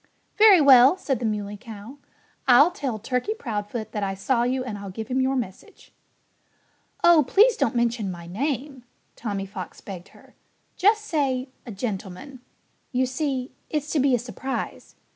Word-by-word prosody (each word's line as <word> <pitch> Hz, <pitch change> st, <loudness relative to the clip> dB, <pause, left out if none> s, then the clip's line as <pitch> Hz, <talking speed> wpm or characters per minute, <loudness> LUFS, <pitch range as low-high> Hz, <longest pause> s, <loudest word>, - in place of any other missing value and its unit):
"Very 425 Hz, -4 st, +7 dB
well!" 275 Hz, +2 st, +7 dB
said 270 Hz, -9 st, -2 dB
the 240 Hz, -, -3 dB
Muley 205 Hz, -1 st, -3 dB
Cow. 225 Hz, +3 st, -11 dB, 0.5 s
"I'll 265 Hz, +7 st, +7 dB
tell 270 Hz, -9 st, -4 dB
Turkey 250 Hz, -, -2 dB
Proudfoot 220 Hz, -, -5 dB
that 210 Hz, -, -3 dB
I 195 Hz, -1 st, -2 dB
saw 235 Hz, +6 st, 0 dB
you 255 Hz, +2 st, 0 dB
and 220 Hz, -5 st, -6 dB
I'll 200 Hz, -1 st, -7 dB
give 220 Hz, +3 st, -7 dB
him 260 Hz, +1 st, +1 dB
your 265 Hz, +1 st, +1 dB
message." 210 Hz, -7 st, -7 dB, 1.1 s
"Oh! 340 Hz, -3 st, +7 dB
Please 440 Hz, -, +5 dB
don't 245 Hz, -, 0 dB
mention 235 Hz, -3 st, 0 dB
my 170 Hz, -2 st, -7 dB
name!" 265 Hz, -, -3 dB, 0.3 s
Tommy 200 Hz, -4 st, -4 dB
Fox 190 Hz, -2 st, -8 dB
begged 190 Hz, -2 st, -9 dB
her. -, -, -20 dB, 0.4 s
"Just 425 Hz, +3 st, +3 dB
say, 270 Hz, -7 st, -1 dB, 0.2 s
'a -, -, -6 dB
gentleman.' 210 Hz, +5 st, -6 dB, 0.5 s
You 260 Hz, -1 st, +1 dB
see, 260 Hz, -1 st, -3 dB, 0.2 s
it's 300 Hz, 0 st, -3 dB
to 305 Hz, -, +1 dB
be 265 Hz, -1 st, +3 dB
a -, -, +2 dB
surprise.... 245 Hz, +3 st, -6 dB
250 Hz, 160 wpm, -24 LUFS, 210-280 Hz, 1.1 s, Very